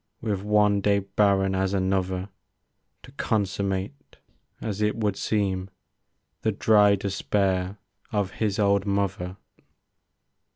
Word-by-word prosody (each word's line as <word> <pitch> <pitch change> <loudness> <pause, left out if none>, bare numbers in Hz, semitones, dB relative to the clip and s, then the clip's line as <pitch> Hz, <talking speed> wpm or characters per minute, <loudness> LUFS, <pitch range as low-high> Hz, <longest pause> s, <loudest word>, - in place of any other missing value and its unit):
With 105 -4 -2
one 105 -1 +3
day 100 0 +3
barren 100 -1 +2
as 95 +1 0
another; 95 0 -1 0.7
To 125 - -13
consummate, 100 +1 -2 0.4
as 105 -2 -4
it 105 0 +1
would 105 -3 0
seem. 95 -3 -1 0.7
The 110 - +1
dry 105 -1 +4
despair 95 -1 -1 0.3
of 100 -3 0
his 105 -2 -1
old 100 -1 +2
mother. 100 -2 -1
100 Hz, 110 wpm, -25 LUFS, 95-105 Hz, 0.7 s, dry